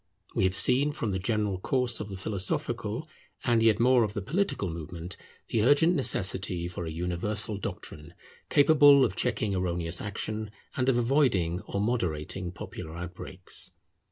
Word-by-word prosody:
We - - +1
have 95 0 +1
seen 130 +9 +4
from 115 -8 -2
the 95 - -1
general 105 -1 -1
course 125 +1 0
of 105 - -5
the 95 - -6
philosophical, 95 -1 -3 0.4
and 120 -1 +2
yet 110 -1 +4
more 125 0 +5
of 105 0 -3
the 105 - -2
political, 155 - -1
movement, 85 +1 -6 0.3
the 110 - +1
urgent 145 +7 +5
necessity 95 - 0
for 90 -1 -5
a - - -4
universal 90 +5 -2
doctrine 85 -4 -7 0.3
capable 145 -2 +6
of 100 -5 -3
checking 105 -2 0
erroneous 85 -2 -1
action, 110 +1 -4 0.3
and 130 0 +1
of 125 - +3
avoiding 115 - +2
or 100 - -3
moderating 90 -5 -2
popular 80 -2 -8
outbreaks. 90 +1 -6
100 Hz, 155 wpm, -28 LUFS, 90-120 Hz, 0.4 s, capable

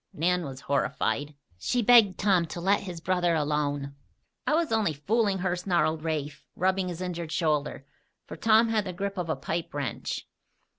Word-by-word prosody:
Nan 180 +3 +1
was 135 -1 -7
horrified. 140 +1 -1 0.2
She 245 - 0
begged 225 -4 +6
Tom 185 -4 +3
to 165 - -6
let 195 +4 +2
his 180 -4 -7
brother 175 0 +1
alone. 145 -2 -1 0.5
"I 300 - +3
was 330 -4 0
only 220 -7 +2
fooling 200 +7 +1
her," 180 -1 0
snarled 165 -4 0
Rafe, 150 -3 -3
rubbing 190 0 +1
his 175 0 -5
injured 170 -3 -4
shoulder, 150 -5 -1 0.4
for - - -8
Tom 225 +1 +4
had 215 -2 +1
the 185 - -4
grip 200 +1 -3
of 170 -2 -3
a 160 - +1
pipe 170 0 -4
wrench. 145 -2 -4
175 Hz, 170 wpm, -27 LUFS, 150-195 Hz, 0.5 s, begged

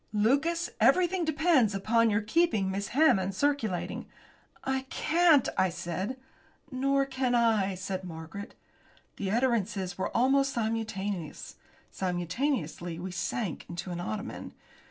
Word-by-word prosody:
Lucas, 280 +11 +1
everything 350 - +4
depends 315 - +3
upon 230 +3 +3
your 205 +1 +1
keeping 215 - +1
Miss 200 +1 -3
Hammond 195 -10 +3
circulating." 255 -8 -1 0.6
"I 265 0 -2
can't," 325 -4 +4
I 190 - +4
said. 180 +8 -4 0.5
"Nor 275 +1 +1
can 260 -2 0
I," 220 -5 +2
said 185 +1 -4
Margaret. 165 +3 -8 0.6
The 195 - -2
utterances 210 -5 0
were - - -1
almost 270 +2 +3
simultaneous. 205 -6 -3 0.3
Simultaneously 175 - -2
we 180 +2 -5
sank 195 0 -3
into 175 +1 -5
an 175 - -4
ottoman. 205 +4 -5
220 Hz, 115 wpm, -29 LUFS, 190-270 Hz, 0.6 s, everything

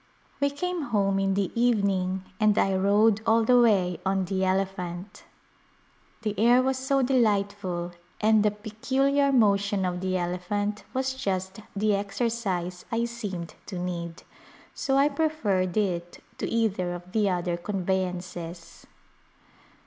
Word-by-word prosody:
We 280 - +2
came 350 +2 -3
home 200 -5 +1
in 195 0 +1
the 195 -2 0
evening 200 -6 +1 0.2
and 215 -1 +3
I 195 -1 +3
rode 205 +3 +3
all 225 0 +3
the 245 +2 +5
way 190 -6 +3
on 190 -1 0
the 190 +1 -1
elephant. 190 0 -2 1.0
The 210 -2 -1
air 240 +3 +5
was 265 0 0
so 270 +1 +1
delightful 205 -8 0 0.3
and 215 0 +4
the 210 - +4
peculiar 265 +7 0
motion 200 -5 +3
of 180 0 -2
the 185 0 0
elephant 195 +4 -2
was 260 0 0
just 190 -5 -3 0.2
the 210 +1 +2
exercise 200 -3 -2
I 230 +1 +1
seemed 205 -8 -5
to 190 - -5
need, 170 -2 -5 0.5
so 270 -1 0
I 280 +1 +5
preferred 235 - 0
it 175 -4 -2 0.2
to - - -2
either 195 -6 0
of 175 +1 -11
the 210 -1 +2
other 175 -1 -1
conveyances. 180 -2 -4
200 Hz, 135 wpm, -26 LUFS, 185-230 Hz, 1.0 s, the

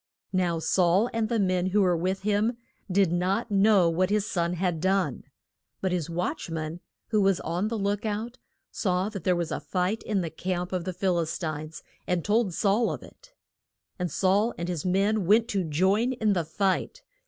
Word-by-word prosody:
Now 180 -3 +1
Saul 180 +6 +2
and 225 -1 0
the 235 - +1
men 185 -3 +1
who 205 +2 +2
were 180 -2 +3
with 185 +3 -1
him 210 +3 +1 0.3
did 190 -2 +3
not 190 +6 0
know 200 -2 +5
what 180 +3 +1
his 210 0 +1
son 170 -1 0
had 175 -2 -1
done. 190 -6 0 0.5
But 190 - -1
his 175 -3 -1
watch 175 - -3
man, 160 +1 -4 0.3
who 215 -2 +2
was 195 -2 +3
on 175 +5 -1
the 225 +1 -2
look 205 +1 -1
out, 225 +3 -3 0.3
saw 185 0 0
that 195 -6 -7
there 180 - +3
was 170 -2 -2
a - - -2
fight 185 +4 -1
in 205 -3 -1
the 165 -2 -4
camp 180 +1 -3
of 180 -2 -2
the 185 - -3
Phil 180 -1 +1
is 165 -1 -2
tines, 155 -2 -5 0.2
and 180 -2 0
told 210 -1 +2
Saul 210 +3 +2
of - - -6
it. - - -17 0.7
And 180 -1 -1
Saul 200 +5 +2
and 170 - -3
his 170 -5 -3
men 195 +1 +1
went 220 +3 +5
to 195 -2 0
join 190 - +2
in 220 -4 +1
the 175 -4 -1
fight. 195 - -1
185 Hz, 200 wpm, -27 LUFS, 175-210 Hz, 0.7 s, know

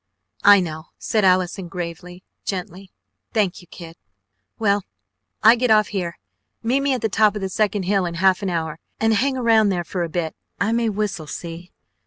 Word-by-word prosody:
"I 205 -1 +8
know!" 160 -2 -5
said 215 -2 0
Allison 185 0 +2
gravely, 175 +1 -7 0.2
gently. 185 0 -5 0.4
"Thank 205 -4 0
you, 175 - -18
kid! 165 -1 -11 0.6
Well. 205 -3 +1 0.6
I 225 +2 +8
get 245 0 0
off 215 -1 +4
here. 180 -4 -3 0.5
Meet 245 +4 +2
me 275 -1 +1
at 250 - -4
the 225 - +1
top 215 0 +3
of 210 - -4
the 190 - -2
second 205 -1 0
hill 190 -1 +1
in 170 - -5
half 185 +2 +3
an 195 - -1
hour, 160 -2 -3 0.2
and 225 0 +3
hang 260 +5 +1
around 225 -4 +4
there 180 -3 -1
for 175 +2 -4
a 170 - -2
bit. 160 -1 -3 0.2
I 210 +2 +1
may 230 -1 +1
whistle, 200 -6 -3
see? 170 +3 -7
195 Hz, 190 wpm, -22 LUFS, 175-215 Hz, 0.6 s, I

